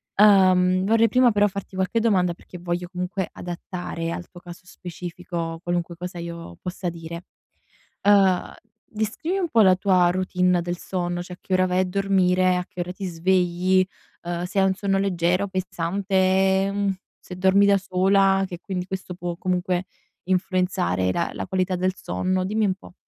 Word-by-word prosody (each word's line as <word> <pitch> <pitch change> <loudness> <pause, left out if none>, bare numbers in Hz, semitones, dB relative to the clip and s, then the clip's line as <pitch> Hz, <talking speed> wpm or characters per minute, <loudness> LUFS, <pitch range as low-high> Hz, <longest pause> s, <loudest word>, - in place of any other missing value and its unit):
Uhm, 185 -2 +5
vorrei 225 +2 +4
prima 250 -1 +4
però 205 0 +3
farti 200 -1 -7
qualche 190 +4 0
domanda 185 -6 +2
perché 180 +1 -13
voglio 175 0 -3
comunque 180 +1 -3
adattare 175 -1 -5
al 175 +1 -6
tuo 175 - -13
caso 175 -1 -11
specifico 175 -2 -6
qualunque 175 0 -2
cosa 180 +1 -7
io 170 - -8
possa 180 0 -4
dire. 170 +1 -8 0.8
Uhm, 195 -3 +3 0.3
descrivi 220 - -3
un 350 -3 -1
po' 230 - +4
la 185 -2 +6
tua 185 -2 +3
routine 180 -1 +1
del 175 0 -4
sonno, 175 -1 -3
cioè 180 0 -9
che 190 - -8
ora 185 0 +3
vai 180 0 +1
a 185 - +3
dormire, 185 -1 +2
a 180 - -2
che 180 - -8
ora 175 +1 -3
ti 195 +1 -8
svegli, 180 +1 +2 0.4
uhm, 175 0 -3
se 180 +2 -3
hai - - +4
un 190 - +2
sonno 195 0 0
leggero, 180 0 +1
pensante, 190 +1 +1
mhmm, 200 -1 0 0.3
se 180 - -10
dormi 190 +2 +4
da 200 0 +5
sola, 195 0 +2
che 175 -2 -7
quindi 185 -3 -4
questo 190 -1 -6
può 175 -1 -5
comunque 180 0 -1 0.4
influenzare 180 - 0
la 170 - -1
la - - -4
qualità 185 0 0
del 185 +1 0
sonno. 185 0 -2
Dimmi 215 +2 0
un 190 - +1
po'. 190 - -16
185 Hz, 170 wpm, -23 LUFS, 175-195 Hz, 0.8 s, la